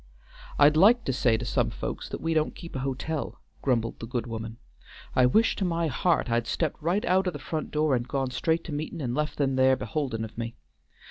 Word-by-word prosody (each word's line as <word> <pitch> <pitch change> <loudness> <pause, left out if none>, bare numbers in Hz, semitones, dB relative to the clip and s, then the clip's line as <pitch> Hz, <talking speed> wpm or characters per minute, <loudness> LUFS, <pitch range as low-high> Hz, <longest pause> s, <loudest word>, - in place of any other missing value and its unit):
"I'd 145 +1 +6
like 225 +8 +6
to 135 - 0
say 120 -3 +2
to 120 - -5
some - - +1
folks - - -5
that - - -5
we 165 0 0
don't 155 -1 +1
keep 170 -4 -10
hotel," 135 +3 -3 0.2
grumbled 115 -4 0
the 115 - -6
good 120 0 -2
woman, 115 -1 -6 0.6
"I 125 -1 +6
wish 220 - +3
to - - -1
my 170 -2 0
heart 170 +1 +1
I'd 115 -1 0
stepped 160 -3 -1
right 175 +7 0
out 185 +1 +2
o' - - +3
the 160 - -6
front 155 +2 -4
door 150 -2 +2
and 120 0 -2
gone 135 -1 -1
straight 160 +6 0
to - - -7
meetin' 155 +3 -4
and 125 -5 -2
left 150 +3 -2
them 135 -2 +1
there 130 0 +5
beholdin' 130 -6 -3
of 110 - -12
me. 115 0 -4
140 Hz, 220 wpm, -27 LUFS, 125-160 Hz, 0.6 s, I'd